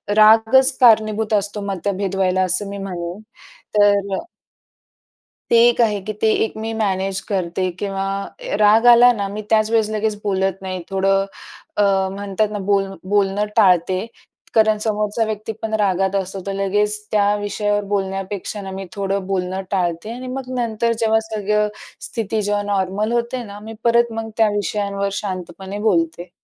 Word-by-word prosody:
रागच 225 Hz, +5 st, +6 dB
कारणीभूत 220 Hz, -2 st, +4 dB
असतो 205 Hz, 0 st, 0 dB
मतभेद 195 Hz, +1 st, -2 dB
व्हायला, 185 Hz, -1 st, +1 dB
असं 185 Hz, +2 st, 0 dB
मी 200 Hz, -, -6 dB
म्हणेन. 180 Hz, -2 st, -5 dB, 0.6 s
तर 205 Hz, 0 st, +6 dB, 0.2 s
अ -, -, -4 dB, 1.3 s
ते 235 Hz, -, +6 dB
एक 240 Hz, -, -1 dB
आहे, 210 Hz, -3 st, +2 dB
की 215 Hz, +3 st, -5 dB
ते 220 Hz, -, +4 dB
एक 220 Hz, -, -3 dB
मी 220 Hz, +1 st, -4 dB
मॅनेज 195 Hz, -3 st, -1 dB
करते 185 Hz, -1 st, -1 dB
किंवा 195 Hz, -1 st, -2 dB, 0.2 s
अ, -, -, -6 dB
राग 215 Hz, +2 st, +5 dB
आला 240 Hz, +1 st, +8 dB
ना, 200 Hz, -3 st, -3 dB
मी 210 Hz, +2 st, -5 dB
त्याच 215 Hz, 0 st, +3 dB
वेळेस 220 Hz, -2 st, +2 dB
लगेच 215 Hz, 0 st, -1 dB
बोलत 190 Hz, -2 st, 0 dB
नाही. 185 Hz, -1 st, -4 dB
थोडं 195 Hz, 0 st, +2 dB, 0.5 s
अ, 205 Hz, -, +4 dB, 0.3 s
म्हणतात 205 Hz, +1 st, -1 dB
ना, 210 Hz, -, -3 dB
बोल 195 Hz, -1 st, +3 dB, 0.3 s
बोलणं 200 Hz, 0 st, +2 dB
टाळते 185 Hz, -2 st, +3 dB, 0.5 s
कारण 220 Hz, -1 st, +4 dB
समोरचा 210 Hz, +1 st, 0 dB
व्यक्ती 215 Hz, 0 st, -4 dB
पण 220 Hz, 0 st, -4 dB
रागात 190 Hz, 0 st, +1 dB
असतो. 195 Hz, 0 st, -2 dB
तर 195 Hz, -, -2 dB
लगेच 205 Hz, +2 st, 0 dB
त्या 205 Hz, -1 st, +3 dB
विषयावर 205 Hz, 0 st, -1 dB
बोलण्यापेक्षा 195 Hz, +1 st, -3 dB
ना, 195 Hz, -1 st, -7 dB
मी 190 Hz, 0 st, -6 dB
थोडं 195 Hz, -1 st, -2 dB
बोलणं 190 Hz, 0 st, -2 dB
टाळते 180 Hz, +1 st, -1 dB
आणि 255 Hz, +1 st, -7 dB
मग 255 Hz, 0 st, -5 dB
नंतर 230 Hz, 0 st, 0 dB
जेव्हा 220 Hz, -1 st, +3 dB
सगळं 210 Hz, 0 st, +1 dB, 0.4 s
स्थिती 220 Hz, -1 st, -2 dB
जेव्हा 205 Hz, 0 st, 0 dB
नॉर्मल 200 Hz, +3 st, 0 dB
होते 240 Hz, +1 st, -1 dB
ना, 205 Hz, -2 st, -9 dB
मी 220 Hz, +2 st, -9 dB
परत 235 Hz, 0 st, +3 dB
मग 225 Hz, 0 st, -4 dB
त्या 220 Hz, -1 st, +4 dB
विषयांवर 200 Hz, -1 st, -1 dB
शांतपणे 190 Hz, 0 st, -6 dB
बोलते. 170 Hz, -2 st, 0 dB
205 Hz, 160 wpm, -20 LUFS, 195-220 Hz, 1.3 s, आला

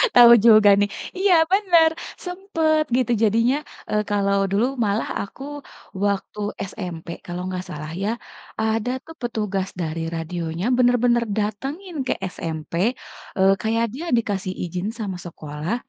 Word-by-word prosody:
Tahu 240 Hz, -1 st, +10 dB
juga 215 Hz, -2 st, +8 dB
nih. 205 Hz, 0 st, +2 dB, 0.3 s
Iya 385 Hz, 0 st, +4 dB, 0.2 s
benar, 355 Hz, -5 st, +5 dB, 0.4 s
sempet, 330 Hz, -4 st, 0 dB
gitu. 250 Hz, -2 st, +1 dB
Jadinya, 230 Hz, +4 st, +3 dB, 0.3 s
eee, 210 Hz, 0 st, +1 dB
kalau 200 Hz, -1 st, +2 dB
dulu, 205 Hz, +5 st, +3 dB, 0.2 s
malah 205 Hz, +2 st, 0 dB
aku 235 Hz, +7 st, -8 dB, 0.6 s
waktu 200 Hz, +1 st, -2 dB, 0.3 s
SMP, 175 Hz, -5 st, -7 dB, 0.2 s
kalau 175 Hz, 0 st, -5 dB
nggak 185 Hz, -1 st, -3 dB
salah 155 Hz, +1 st, -6 dB
ya, 210 Hz, -, 0 dB, 0.5 s
ada 220 Hz, +2 st, 0 dB
tuh, 325 Hz, 0 st, -11 dB
petugas 210 Hz, -5 st, -2 dB
dari 165 Hz, 0 st, -3 dB
radionya 165 Hz, +2 st, -3 dB
benar-benar 245 Hz, -1 st, +3 dB
datangin 270 Hz, -, -3 dB
ke -, -, +2 dB, 0.2 s
SMP, 160 Hz, -1 st, -6 dB, 0.6 s
eee, 190 Hz, +1 st, +5 dB
kayak 225 Hz, +1 st, +1 dB
dia 310 Hz, +6 st, -6 dB
dikasih 195 Hz, -4 st, -2 dB
izin 180 Hz, +3 st, -3 dB
sama 195 Hz, -4 st, -3 dB
sekolah, 155 Hz, +3 st, -4 dB
210 Hz, 130 wpm, -23 LUFS, 185-245 Hz, 0.6 s, Tahu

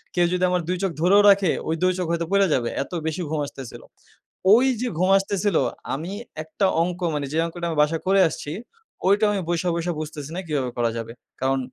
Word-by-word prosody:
কেউ 175 Hz, -, +4 dB
যদি 180 Hz, 0 st, 0 dB
আমার 180 Hz, -1 st, +1 dB
২ 180 Hz, 0 st, -1 dB
চোখ 190 Hz, -, +1 dB
ধরেও 200 Hz, +4 st, +6 dB
রাখে 195 Hz, -3 st, +4 dB, 0.2 s
ওই 160 Hz, -, +1 dB
২ 185 Hz, -, +4 dB
চোখ 180 Hz, -, -1 dB
হয়তো 170 Hz, 0 st, -1 dB
পইড়া 200 Hz, 0 st, +4 dB
যাবে। 120 Hz, -2 st, 0 dB
এত -, -, -17 dB, 0.2 s
বেশি 160 Hz, +3 st, -2 dB
ঘুম 155 Hz, -1 st, -1 dB
আসতেসিল। 135 Hz, -4 st, -9 dB, 0.7 s
ওইযে 250 Hz, 0 st, +3 dB
ঘুম 185 Hz, +2 st, +2 dB
আসতেসিল 195 Hz, -1 st, 0 dB, 0.4 s
আমি 160 Hz, +7 st, -4 dB, 0.3 s
একটা 160 Hz, +5 st, -1 dB, 0.2 s
অংক 175 Hz, 0 st, -3 dB
মানে 145 Hz, -1 st, -2 dB
যে 155 Hz, -, -2 dB
অঙ্কটা 170 Hz, +1 st, -5 dB
আমি 160 Hz, -, -3 dB
বাসায় 160 Hz, +2 st, -1 dB
করে 195 Hz, 0 st, +5 dB
আসছি, 145 Hz, -, -6 dB, 0.6 s
ওইটা 205 Hz, +2 st, +4 dB
আমি 200 Hz, -2 st, -1 dB
বইসা, 175 Hz, +1 st, 0 dB
বইসা 170 Hz, +1 st, -2 dB
বুঝতেসি 150 Hz, -1 st, -7 dB
না -, -, -3 dB
কিভাবে 135 Hz, -5 st, -1 dB
করা 120 Hz, -1 st, +1 dB
যাবে। 115 Hz, 0 st, -5 dB, 0.3 s
কারণ 135 Hz, 0 st, +1 dB
175 Hz, 205 wpm, -23 LUFS, 150-190 Hz, 0.7 s, ধরেও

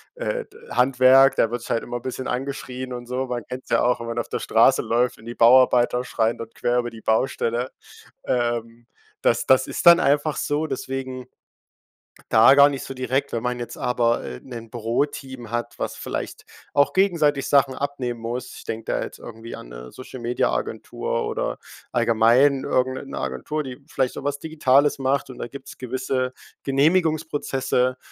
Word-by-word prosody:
äh, -, -, -3 dB
d 415 Hz, -, -19 dB
Handwerk, 130 Hz, +1 st, +5 dB
da 115 Hz, -, +2 dB
wird 120 Hz, 0 st, -4 dB
sich -, -, -7 dB
halt 115 Hz, -, +1 dB
immer 120 Hz, -, -4 dB
bisschen 130 Hz, +1 st, -5 dB
angeschrien 130 Hz, -1 st, -4 dB
und 120 Hz, -1 st, -7 dB
so. 130 Hz, +2 st, -2 dB
Man 125 Hz, -2 st, -4 dB
kennt's 130 Hz, +1 st, -8 dB
ja -, -, +4 dB
auch, 125 Hz, 0 st, +2 dB
wenn 115 Hz, -, -6 dB
man 115 Hz, -, -3 dB
auf -, -, -4 dB
der -, -, -2 dB
Straße -, -, +4 dB
läuft 120 Hz, +2 st, +1 dB
und 110 Hz, -, -16 dB
die 120 Hz, +1 st, -7 dB
Bauarbeiter 125 Hz, 0 st, +5 dB
schreien 115 Hz, -2 st, 0 dB
dort 115 Hz, 0 st, -8 dB
quer 120 Hz, 0 st, 0 dB
über 120 Hz, 0 st, -3 dB
die 115 Hz, -1 st, -12 dB
Baustelle. 120 Hz, +2 st, 0 dB, 0.5 s
Ähm, 120 Hz, -1 st, -2 dB, 0.4 s
das -, -, +2 dB
das 130 Hz, 0 st, +5 dB
ist -, -, -4 dB
dann 170 Hz, +1 st, +10 dB
einfach 145 Hz, +1 st, +1 dB
so, 150 Hz, +2 st, -1 dB
deswegen 130 Hz, -2 st, -5 dB, 1.1 s
da 110 Hz, +4 st, +7 dB
gar 140 Hz, 0 st, +8 dB
nicht 140 Hz, -2 st, -5 dB
so -, -, -6 dB
direkt, 130 Hz, +2 st, -2 dB
wenn 115 Hz, 0 st, -2 dB
man 125 Hz, 0 st, -2 dB
jetzt 120 Hz, -, -6 dB
aber, 120 Hz, -1 st, +1 dB
äh, 60 Hz, -, -7 dB
'nen 115 Hz, -3 st, -9 dB
Büroteam 120 Hz, +1 st, -3 dB
hat, 120 Hz, 0 st, -3 dB
was -, -, -4 dB
vielleicht -, -, -5 dB, 0.3 s
auch 145 Hz, 0 st, +3 dB
gegenseitig 160 Hz, -8 st, +2 dB
Sachen 140 Hz, -2 st, +3 dB
abnehmen 130 Hz, -4 st, -3 dB
muss. 120 Hz, +2 st, -5 dB
Ich -, -, -11 dB
denke 110 Hz, 0 st, -5 dB
da -, -, -1 dB
jetzt -, -, -9 dB
irgendwie 115 Hz, +1 st, -9 dB
an, -, -, -9 dB
'ne -, -, -10 dB
Social-Media-Agentur 125 Hz, -1 st, -3 dB
oder 65 Hz, 0 st, -2 dB, 0.3 s
allgemein 120 Hz, +4 st, +3 dB
irgend 130 Hz, 0 st, +1 dB
'ne 130 Hz, -, -7 dB
'ne 135 Hz, -, -7 dB
Agentur, 70 Hz, -, -3 dB
die 130 Hz, 0 st, -9 dB
vielleicht 130 Hz, -2 st, -1 dB
so -, -, -7 dB
was 145 Hz, 0 st, -2 dB
Digitales 145 Hz, -3 st, +2 dB
macht 135 Hz, +1 st, 0 dB
und 130 Hz, -, -10 dB
da -, -, -4 dB
gibt's 140 Hz, -1 st, -10 dB
gewisse 130 Hz, 0 st, -2 dB, 0.3 s
Genehmigungsprozesse, 145 Hz, -4 st, +1 dB
130 Hz, 180 wpm, -23 LUFS, 120-140 Hz, 1.1 s, dann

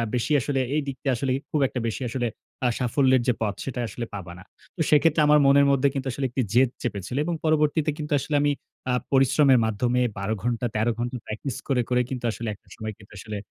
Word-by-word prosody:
বেশি 125 Hz, +5 st, -1 dB
আসলে 135 Hz, +1 st, -1 dB, 0.2 s
এই 155 Hz, -, +2 dB
দিকটা 135 Hz, 0 st, -3 dB
আসলে 130 Hz, +2 st, -1 dB, 0.2 s
খুব 150 Hz, -, +1 dB
একটা 125 Hz, -, -4 dB
বেশি 115 Hz, -, -4 dB
আসলে 120 Hz, 0 st, -1 dB, 0.4 s
আ -, -, +5 dB
সাফল্যের 130 Hz, +1 st, +3 dB
যে 125 Hz, -, +4 dB
পথ 105 Hz, -3 st, 0 dB
সেটা 125 Hz, -2 st, -4 dB
আসলে 120 Hz, +1 st, -5 dB
পাবা 90 Hz, -3 st, -7 dB
না।" -, -, -12 dB, 0.3 s
তো 165 Hz, -, -3 dB
সেক্ষেত্রে 155 Hz, +1 st, +4 dB
আমার 150 Hz, 0 st, +6 dB
মনের 140 Hz, +1 st, +6 dB
মধ্যে 140 Hz, +1 st, +3 dB
কিন্তু 135 Hz, -1 st, -3 dB
আসলে 135 Hz, +2 st, -3 dB
একটি 130 Hz, +2 st, -1 dB
জেদ 125 Hz, 0 st, +5 dB
চেপেছিল 105 Hz, +2 st, -3 dB
এবং 175 Hz, -, -1 dB
পরবর্তীতে 155 Hz, 0 st, +2 dB
কিন্তু 150 Hz, -1 st, -6 dB
আসলে 145 Hz, +2 st, -2 dB
আমি 145 Hz, 0 st, +3 dB, 0.4 s
আ -, -, +2 dB, 0.2 s
পরিশ্রমের 135 Hz, -1 st, +5 dB
মাধ্যমে 120 Hz, +3 st, 0 dB, 0.2 s
১২ 100 Hz, +3 st, -1 dB
ঘন্টা 120 Hz, 0 st, -1 dB
১৩ 110 Hz, +2 st, +2 dB
ঘন্টা 120 Hz, +1 st, -2 dB
প্র্যাকটিস 110 Hz, +4 st, -5 dB
করে, 130 Hz, -3 st, +2 dB
করে 125 Hz, 0 st, +3 dB
কিন্তু 125 Hz, -2 st, -4 dB
আসলে 115 Hz, +1 st, -6 dB
একটা -, -, -31 dB
সময় 110 Hz, -1 st, -5 dB
কিন্তু 105 Hz, 0 st, -16 dB
আসলে 105 Hz, 0 st, -6 dB
130 Hz, 215 wpm, -25 LUFS, 115-140 Hz, 0.4 s, আমার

